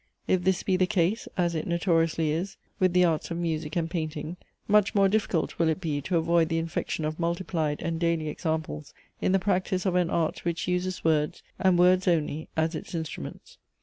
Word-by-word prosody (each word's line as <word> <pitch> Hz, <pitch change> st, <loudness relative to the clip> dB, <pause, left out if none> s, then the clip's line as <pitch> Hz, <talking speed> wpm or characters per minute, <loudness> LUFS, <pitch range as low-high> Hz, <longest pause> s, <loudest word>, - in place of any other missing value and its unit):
If 185 Hz, -1 st, +1 dB
this 190 Hz, 0 st, +1 dB
be 185 Hz, -2 st, +2 dB
the 185 Hz, 0 st, +3 dB
case, 180 Hz, +6 st, +1 dB
as 175 Hz, -2 st, +1 dB
it 160 Hz, -, -3 dB
notoriously 165 Hz, -2 st, +1 dB
is, 175 Hz, +5 st, -3 dB, 0.2 s
with 185 Hz, -2 st, +3 dB
the 180 Hz, 0 st, +5 dB
arts 160 Hz, -3 st, 0 dB
of 170 Hz, -, -3 dB
music 160 Hz, -3 st, -2 dB
and 165 Hz, -2 st, 0 dB
painting, 155 Hz, -1 st, -4 dB, 0.3 s
much 210 Hz, -1 st, +3 dB
more 195 Hz, -1 st, +5 dB
difficult 195 Hz, -4 st, 0 dB
will 165 Hz, -1 st, +3 dB
it 160 Hz, -, 0 dB
be, 155 Hz, -5 st, -2 dB
to 175 Hz, +5 st, 0 dB
avoid 165 Hz, 0 st, +2 dB
the 165 Hz, -, 0 dB
infection 165 Hz, -1 st, -2 dB
of 155 Hz, +2 st, -3 dB
multiplied 170 Hz, -3 st, -1 dB
and 165 Hz, -1 st, -2 dB
daily 165 Hz, -2 st, 0 dB
examples 155 Hz, -2 st, -3 dB, 0.3 s
in -, -, +2 dB
the 195 Hz, -, +5 dB
practice 185 Hz, -1 st, 0 dB
of 190 Hz, -, +2 dB
an 180 Hz, -2 st, +2 dB
art, 165 Hz, -2 st, -1 dB
which 170 Hz, 0 st, -2 dB
uses 180 Hz, +1 st, -1 dB
words, 150 Hz, -2 st, +1 dB, 0.2 s
and 185 Hz, -2 st, +4 dB
words 180 Hz, +1 st, +4 dB
only, 160 Hz, -3 st, 0 dB
as 160 Hz, +1 st, +1 dB
its 160 Hz, +2 st, -6 dB
instruments. 160 Hz, -2 st, -6 dB
170 Hz, 200 wpm, -27 LUFS, 160-180 Hz, 0.3 s, the